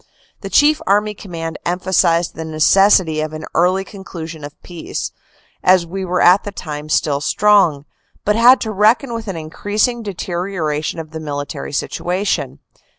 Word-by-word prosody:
The - - -7
Chief 300 +1 +4
Army 210 +2 +2
Command 165 -5 -7
emphasized 175 -1 +1
the 160 - -6
necessity 160 +1 +3
of 155 0 -4
an 155 0 -6
early 185 +2 +2
conclusion 165 -6 -9
of 145 0 -10
peace, 175 -2 -6 0.5
as 185 -1 +4
we 190 +3 -5
were 180 -1 -1
at 180 +3 +6
the 205 - -6
time 150 -5 -7
still 145 -2 +1
strong, 180 -6 +3 0.4
but 210 - +2
had 245 +3 +6
to 220 - -3
reckon 220 +5 +2
with 230 -1 -5
an 195 - -4
increas 205 +8 -1
ing 240 -1 -5
deterioration 175 -6 -3
of 160 -1 -7
the 160 - -6
military 145 -2 -5
situation. 180 +7 -2
180 Hz, 155 wpm, -18 LUFS, 160-205 Hz, 0.5 s, at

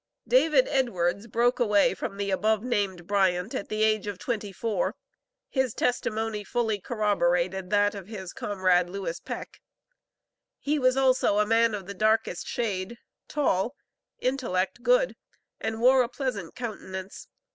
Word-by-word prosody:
David 315 - +4
Edwards 200 -6 0
broke 240 +3 +1
away 210 -5 +4
from 195 +1 -5
the 200 -1 -2
above 215 +3 +1
named 200 -8 -1
Bryant, 190 0 +1
at - - -4
the 215 0 0
age 215 -1 +2
of 205 -2 -4
twenty 210 -1 -3
four. 205 0 -1 0.5
His 265 -4 -1
testimony 220 -3 -1
fully 220 -1 -1
corroborated 190 -4 0
that 205 +1 +3
of 195 -3 -8
his 190 -5 -7
comrade, 185 -3 +1
Lewis 180 -3 -4
Peck. - - -7 1.0
He 295 +1 -1
was 255 0 +3
also 260 -6 +3
a 210 - +4
man 225 0 +3
of 195 -2 -7
the 200 - -6
darkest 215 +3 +1
shade, 210 -1 -2 0.3
tall, 245 -4 0 0.4
intellect 240 -6 -1
good, - - +3 0.4
and 220 0 -3
wore 255 +2 +6
a 240 - 0
pleasant 250 - -4
countenance. 195 -5 -6
210 Hz, 145 wpm, -27 LUFS, 190-240 Hz, 1.0 s, wore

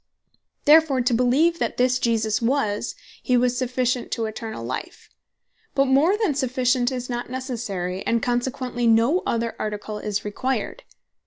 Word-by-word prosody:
Therefore 300 -3 +5
to 245 0 +1
beleeve 275 +8 +3
that - - -2
this 255 0 +2
Jesus 225 -2 +1
was 230 -3 0 0.3
He, 250 - +2
was 245 0 +2
sufficient 250 0 -1
to 225 - -1
eternall 220 - -6
life: 130 - -6 0.6
but 275 - +4
more 285 +9 +3
than 420 -9 +1
sufficient 255 -2 +1
is 250 -1 -4
not 240 -1 -4
Necessary; 225 -8 -4
and 230 - +2
consequently 245 0 -1
no 230 +11 +4
other 230 0 -1
Article 210 0 -4
is 210 -1 -3
required. 260 - -2
245 Hz, 145 wpm, -23 LUFS, 225-260 Hz, 0.6 s, Therefore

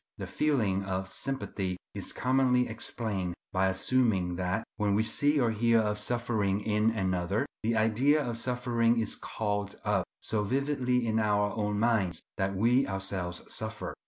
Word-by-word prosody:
The - - -5
feeling 110 -11 +1
of 95 -1 -3
sympathy 100 -9 -3 0.2
is - - -5
commonly 125 -1 +2
explained 105 -5 -3 0.2
by 95 0 +3
assuming 95 -2 +1
that, 95 +4 -1
when 100 -1 +1
we 110 - +3
see 145 +6 +2
or 120 -3 +2
hear 115 +1 +3
of 105 -1 0
suffering 110 -3 0
in 105 +1 +2
another, 95 -2 0 0.2
the 115 +1 0
idea 120 +8 +3
of 120 -1 -3
suffering 120 -2 +1
is 110 - -1
called 105 -2 -3
up - - +1
so 105 -2 0
vividly 125 0 0
in 110 -1 +1
our 105 -1 +1
own 105 -2 -1
minds 110 -5 +2 0.2
that 95 0 -1
we 120 +7 +3
ourselves 95 -2 -3
suffer. - - -4
110 Hz, 155 wpm, -29 LUFS, 95-120 Hz, 0.2 s, by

